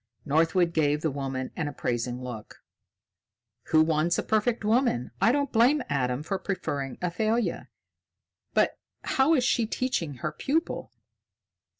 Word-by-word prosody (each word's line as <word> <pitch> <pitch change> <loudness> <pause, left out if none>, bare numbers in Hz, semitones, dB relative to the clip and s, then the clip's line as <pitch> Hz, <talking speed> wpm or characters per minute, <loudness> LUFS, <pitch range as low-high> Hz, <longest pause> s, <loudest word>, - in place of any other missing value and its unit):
Northwood 165 +4 +2
gave 150 -2 +2
the 160 - 0
woman 135 -2 -4
an 155 -4 -2
appraising 125 -2 -3
look. 120 -4 -8 1.1
"Who 155 0 +4
wants 160 +2 +1
a - - 0
perfect 220 +1 0
woman? 220 - +1
I 225 - +5
don't 280 0 0
blame 250 +5 +4
Adam 130 -1 0
for 190 +4 -2
preferring 145 -9 -3
Athalia. 220 +6 0 0.9
But - - +2 0.2
how 275 +5 +3
is 255 - +2
she 235 -2 +2
teaching 195 - -2
her 150 +5 -3
pupil?" 305 - -2
165 Hz, 130 wpm, -27 LUFS, 140-230 Hz, 1.1 s, I